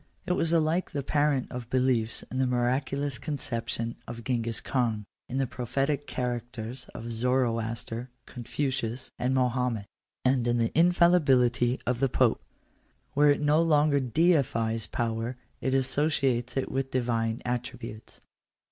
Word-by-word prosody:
It 180 - +1
was 165 -2 0
alike 165 +2 +2
the 140 -2 -2
parent 145 -1 +1
of 125 -2 -6
beliefs 125 -3 +1
in 130 - -2
the 130 - +3
mira 125 +2 +2
culous 140 -2 -3
conception 115 -5 -3
of 115 0 -7
Gengis 115 -3 -1
Khan, 115 -4 -1 0.2
in 130 - -3
the 135 - +2
prophetic 135 +4 -2
characters 120 0 -4
of 115 +1 -6
Zoroaster, 115 0 -1 0.2
Confucius, 125 0 -3
and 130 +2 +1
Mahomet, 125 -4 +1 0.4
and 130 -2 +3
in 120 0 +2
the 115 -1 +1
infallibility 140 -8 +4
of 125 -1 0
the 135 0 +2
Pope. - - +2 0.7
Where 145 +1 +5
it 145 - +3
no 150 +2 +4
longer 150 -3 +4
deifies 125 -6 +1
power, 115 +1 -2 0.2
it 130 0 0
associates 135 -2 +1
it 135 - -1
with 135 0 -1
divine 115 -2 -1
attributes. 120 -3 -5
125 Hz, 140 wpm, -28 LUFS, 115-140 Hz, 0.7 s, Where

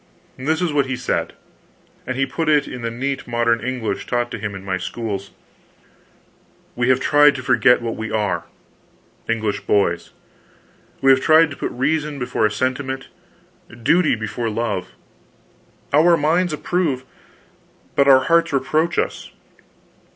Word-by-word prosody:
This 155 +6 -1
is 165 -4 -1
what 140 -2 +2
he 130 - -2
said 125 0 -2 0.7
and 130 0 -3
he 135 - +2
put 160 +3 -2
it 150 -2 +3
in 125 - -7
the 115 - -2
neat 135 +4 -4
modern 120 -1 +1
English 125 -2 -3
taught 120 -1 -1
him 105 -3 -4
in 95 0 -9
my 95 -1 -1
schools: 100 0 -5 1.5
"We 120 +1 0
have 130 0 +4
tried 145 +1 +5
to 130 - -6
forget 125 -1 +4
what 115 -1 -3
we 110 0 -5
are 105 -2 -1 0.8
English 110 -3 -1
boys! 90 -4 +1 0.9
We 135 - +6
have 130 0 +4
tried 160 +1 +5
to - - -6
put - - -3
reason 150 +2 -1
before 125 -4 0
sentiment, 130 +4 -3 0.7
duty 165 +2 +3
before 110 +1 -3
love; 110 -4 -2 1.1
our 165 +4 +5
minds 165 +4 +1
approve, 150 -3 -1 0.9
but 140 - +3
our 135 -1 +7
hearts 170 +3 +2
reproach 155 +5 0
us. - - -2
130 Hz, 145 wpm, -20 LUFS, 115-150 Hz, 1.5 s, our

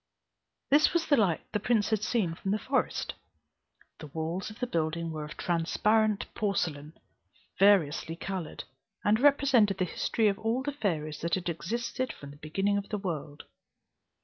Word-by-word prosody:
This 295 +2 +5
was 340 -1 +1
the 290 - +4
light 195 - +2
the 210 - 0
prince 215 +1 +1
had 215 -2 +2
seen 205 -10 0
from 195 - -5
the 205 - +2
forest. 255 +4 -1 0.9
The 155 - -8
walls 160 +6 -3
of 215 - -11
the 250 - 0
building 165 -4 -1
were 155 -1 -4
of 150 - -10
transparent 210 +5 +1
porcelain, 160 -8 -1 0.7
variously 170 -5 +4
coloured, 180 -2 -5 0.4
and 215 +2 +3
represented 265 -7 +4
the 185 - +1
history 215 +5 0
of 200 -1 +1
all 230 +4 0
the 290 - -2
fairies 160 - -2
that 170 0 +1
had 180 -2 -3
existed 235 +10 -3
from 140 -1 -11
the 145 - -14
beginning 195 +7 0
of 200 - -9
the 210 - -1
world. 155 -6 -5
195 Hz, 165 wpm, -29 LUFS, 165-220 Hz, 0.9 s, This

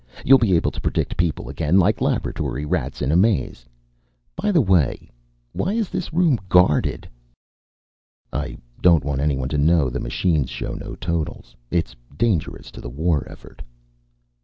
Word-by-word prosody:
You'll 135 +1 +7
be 105 -7 +3
able 80 - +1
to - - -7
predict - - -1
people 85 -3 -1
again, 75 +6 +1
like 95 - +3
laboratory 70 +4 -1
rats 65 -3 -2
in 65 - +1
a - - +2
maze. 90 - +1 0.7
By 210 - 0
the 175 - +4
way 95 - +1 0.4
why 190 - -1
is 225 -3 -1
this 180 -2 -4
room 160 -7 +2
guarded?" 90 -6 +3 1.3
"I 75 +3 -3 0.2
don't 85 -6 +5
want 70 -2 -1
anyone 70 -3 0
to 75 - -1
know 75 -3 +3
the - - -3
machines 70 +2 0
show - - -5
no - - -7
totals. 85 -2 -4
It's 85 -8 -1 0.2
dangerous 100 -8 -1
to - - -11
the - - -7
war 75 +2 0
effort." - - -14
80 Hz, 160 wpm, -22 LUFS, 70-95 Hz, 1.3 s, You'll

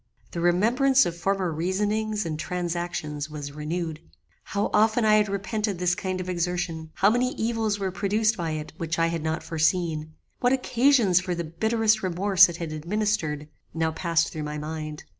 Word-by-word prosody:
The 170 - -4
remembrance 240 +10 +4
of 170 - -3
former 190 0 0
reasonings 210 +6 -1
and 155 -2 -3
transactions 170 -4 -3
was 145 -2 -6
renewed. 155 +2 -4 0.5
How 200 0 -1
often 220 +2 +3
I 215 0 +6
had 210 -1 +2
repented 205 0 -2
this 180 0 +1
kind 185 -1 -3
of 185 - -5
exertion; 175 -2 -2
how 200 +2 +4
many 250 +2 0
evils 225 -2 0
were 195 -2 -2
produced 210 +4 +1
by 170 -4 -3
it 155 -1 -5
which 165 0 -2
I 165 - +3
had 165 -1 -3
not 160 +1 -2
foreseen; 160 -1 0 0.2
what 245 +1 +3
occasions 250 -7 +3
for 185 -1 -3
the 170 - -3
bitterest 220 +6 +1
remorse 190 +1 +4
it 170 - -6
had 165 -2 -5
administered, 155 -3 -1 0.3
now 160 0 +1
passed 165 0 0
through 155 - -4
my 150 0 -4
mind. 155 0 -5
180 Hz, 175 wpm, -26 LUFS, 160-210 Hz, 0.5 s, I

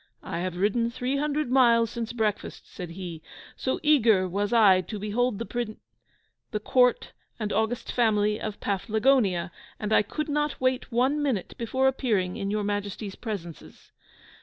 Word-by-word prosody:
"I - - -4
have 180 0 -3
ridden 215 +5 +1
three 255 +3 -2
hundred 295 -2 -1
miles 235 -3 +4
since 235 -1 -4
breakfast," 220 -4 -2
said 180 -2 -8
he, 170 -2 -7 0.3
"so 260 - -2
eager 225 -11 +4
was 200 +4 -2
I 205 -6 +6
to 210 +4 -7
behold 215 +3 0
the 230 - -4
Prin 235 -3 -4 0.7
the 210 - -2
Court 250 +3 +2 0.3
and 210 -2 -2
august 220 +3 -1
family 210 -3 +2
of 215 -2 -5
Paflagonia, 205 -2 +1 0.3
and 210 0 -1
I - - +6
could 305 +9 -4
not 295 0 -1
wait 255 0 0
one 260 +5 +2
minute 260 -10 -1
before 260 +3 +1
appearing 215 -9 0
in 200 -3 -3
your 210 0 -1
Majesties' 205 0 -3
presences." 190 -9 -8
220 Hz, 160 wpm, -26 LUFS, 200-250 Hz, 0.7 s, I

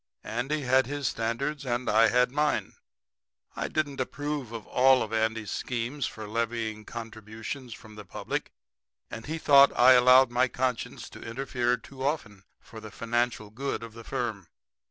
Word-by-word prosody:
Andy 135 +6 -2
had 130 0 +3
his 145 -1 -2
standards 135 +6 -2
and 125 -1 -2
I 110 +2 +5
had 125 0 +3
mine. 150 +2 0 0.8
I - - -2
didn't 145 -3 -2
approve 145 -2 -4
of 115 -2 -7
all 130 0 +4
of 110 - -7
Andy's 110 -2 0
schemes 125 +2 -2
for 110 -1 -8
levying 110 -1 -2
contributions 115 +2 -7
from 110 -1 -14
the 105 0 -9
public, 95 - -4 0.6
and 115 - -7
he 160 +2 -3
thought 140 -3 +7
I 125 +2 +8
allowed 125 0 +7
my 125 +2 +3
conscience 125 -2 -3
to - - -11
interfere 125 0 -1
too 130 +2 -10
often 115 -9 -3
for 110 - -12
the 110 0 -9
financial 115 -1 -2
good 135 +1 -3
of 115 -1 -9
the 115 0 -10
firm. 110 -7 -4
120 Hz, 160 wpm, -28 LUFS, 110-135 Hz, 0.8 s, I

